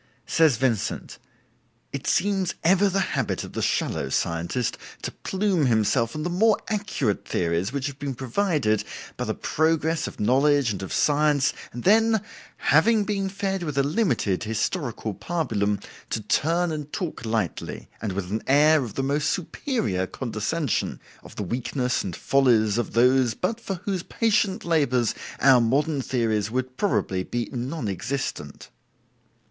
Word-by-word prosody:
Says 160 -7 +3
Vincent: 120 -5 -1 0.7
"It - - -4
seems 195 -2 +1
ever 190 +4 +4
the 195 +1 +1
habit - - -1
of - - -9
the - - -2
shallow - - 0
scientist 85 +9 -1 0.3
to - - -3
plume 190 -6 0
himself 115 +1 +2
on 155 - -3
the 175 - -1
more 215 +4 +4
accurate 200 - -1
theories 85 +4 0
which 140 -1 -2
have 140 -1 -5
been 140 -2 -3
provided 130 - +1
for - - -13
him - - -10
by - - -2
the - - -2
progress 160 +1 +1
of - - -9
knowledge 135 +2 +3
and 100 - -4
of 95 - -6
science, 145 -1 +2 0.2
and 120 - -7
then, 220 +2 +4 0.4
having 205 +9 +4
been 195 -2 -1
fed 195 -1 -2
with 150 -5 -4
a 140 - +4
limited 145 - 0
historical 110 - -2
pabulum, 105 - -1 0.3
to - - -1
turn 165 +10 +1
and 150 -1 -5
talk 175 - -4
lightly, 110 -6 -3
and 105 -4 -2
with 95 -1 -4
an 110 - -1
air 150 +2 +5
of 110 -4 -7
the 135 - -1
most 145 +2 +1
superior 135 - -1
condescension, 130 - -2 0.2
of - - -14
the - - -3
weakness 125 +4 -1
and 90 -3 -4
follies 120 -5 +3
of 120 - -3
those 125 -1 +4
but 220 +5 -2
for 195 - -3
whose 195 -3 -1
patient 215 0 0
labors 140 -8 +2 0.3
our 130 -2 +7
modern 140 +5 +1
theories 110 -5 0
would 130 +2 -3
probably 95 - 0
be 120 +3 -3
non 130 +1 -3
existent." 100 - -4
135 Hz, 155 wpm, -25 LUFS, 115-170 Hz, 0.7 s, our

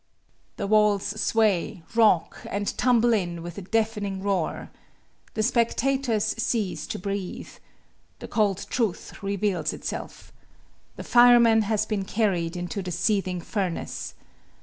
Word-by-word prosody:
The 200 - -3
walls 210 -1 +3 0.2
sway, 205 -7 +1
rock, 220 -7 +3
and 200 0 -2
tumble 240 -1 +3
in 175 -5 -2
with 175 +3 -7
a - - -7
deafening 205 -1 -1
roar. 195 -5 -2 0.6
The 215 - 0
spectators 235 -1 +1
cease 185 -10 -1
to - - -4
breathe. 195 0 -5 0.7
The - - -9
cold 205 -3 0
truth 225 -8 -2
reveals 195 -5 -1
itself. - - -7 0.6
The - - -7
fireman 240 -2 +6
has 215 -1 +1
been 210 -3 -2
carried 185 -5 0
into 175 +3 -4
the 180 - -5
seething 180 0 0
furnace. 185 -1 -4
205 Hz, 125 wpm, -25 LUFS, 185-225 Hz, 0.7 s, fireman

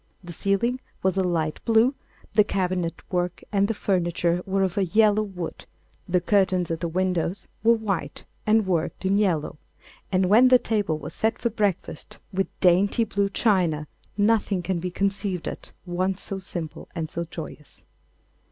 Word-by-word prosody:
The 175 -1 -8
ceiling 200 +8 0 0.2
was 190 -1 +2
a 190 - +2
light 165 -4 -1
blue, 230 +3 +4 0.4
the 210 0 +6
cabinet 180 -4 -2
work 180 -1 -1
and 200 -1 +2
the 225 - -1
furniture 175 -3 0
were 195 0 +1
of 185 -2 -1
a 200 - +2
yellow 215 +3 +4
wood, 185 -5 -6 0.4
the 180 +1 +3
curtains 185 -2 +2
at 165 - -2
the 170 - -2
windows 185 +1 -1 0.2
were 230 +1 +6
white 195 -10 -3 0.2
and 215 0 +4
worked 175 0 -1
in 195 +2 +3
yellow, 165 -7 0 0.5
and 185 0 +3
when 220 +7 +6
the 255 0 +7
table 205 -9 0
was 150 - -8
set 225 +1 0
for 235 - -1
breakfast 205 -4 -2 0.2
with 195 +1 0
dainty 195 +5 +4
blue 200 -2 0
china 180 -8 +1 0.3
nothing 205 -3 +2
can 185 -1 -1
be 180 +2 -3
conceived 195 -1 -1
at - - -6
once 185 +2 -1
so 195 - -4
simple 170 -4 -6
and 160 -2 -3
so 170 - -2
joyous. 160 -2 -9
190 Hz, 165 wpm, -25 LUFS, 175-205 Hz, 0.5 s, the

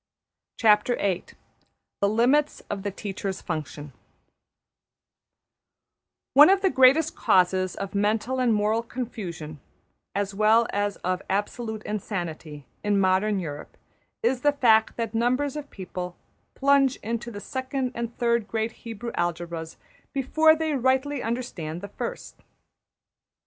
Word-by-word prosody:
\chapter{The 210 -2 -1
Limits 260 +7 +2
of 200 -1 -3
the 205 - -2
Teacher's 195 -1 -5
Function} 150 -3 -5 2.4
One 290 +5 +9
of 390 0 +4
the 385 - +2
greatest 270 +5 +5
causes 185 0 +2
of 195 -1 -5
mental 215 +5 0
and 250 -2 +3
moral 215 +1 +2
confusion, 190 - -6 0.6
as 200 0 -1
well 215 +3 +4
as 205 0 0
of 185 0 -1
absolute 215 +2 -2
insanity, 170 -8 -5 0.2
in 205 -1 +2
modern 195 +2 +2
Europe, 150 -4 -7 0.5
is 265 - +1
the 290 +1 +3
fact 225 -5 +3
that 230 -2 -3
numbers 255 +5 +1
of 295 -1 -6
people 180 -2 -6 0.4
plunge 275 -1 +4
into 235 +2 -3
the 205 -3 -7
second 260 +3 -3
and 235 0 -5
third 235 -3 +1
great 225 0 -1
Hebrew 230 +1 -7
algebras 170 -1 -3 0.4
before 315 +4 +4
they 315 -1 -1
rightly 265 +1 +1
understand 220 -9 -4
the 200 - -7
first. - - -6
220 Hz, 120 wpm, -25 LUFS, 190-255 Hz, 2.4 s, One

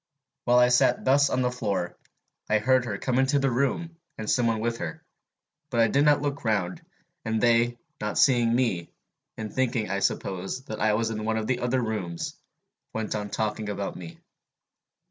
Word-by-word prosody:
While 120 0 +4
I 125 0 +6
sat 125 - +3
thus 140 +2 +4
on 130 - +1
the 125 - +1
floor, 100 -7 -2 0.5
I 110 - +4
heard 130 +3 +3
her 100 -4 -3
come 130 +4 0
into 135 +2 +3
the 135 -1 +1
room, 140 +7 -1 0.2
and 110 - -5
some 120 +1 +2
one 115 -1 +1
with 115 +1 -2
her; 80 -2 -5 0.7
but 120 -4 -1
I 115 -1 +5
did 140 +5 +3
not 145 -1 +4
look 140 -1 -2
round, 105 - 0 0.4
and 110 -1 -1
they, 120 +1 +3 0.2
not 105 0 -3
seeing 120 -4 +4
me, 115 -10 0 0.5
and 110 -1 -5
thinking, 120 -5 0
I 100 - 0
suppose, 95 +4 -2
that 110 -5 -6
I 110 -1 +3
was 115 +1 0
in 110 -1 -4
one 110 0 0
of 110 - -2
the 125 +1 0
other 125 +1 0
rooms, 95 -7 -3 0.6
went 110 -1 -2
on 105 -1 -3
talking 105 0 -2
about 100 -1 -3
me. 85 -2 -9
115 Hz, 190 wpm, -26 LUFS, 105-125 Hz, 0.7 s, I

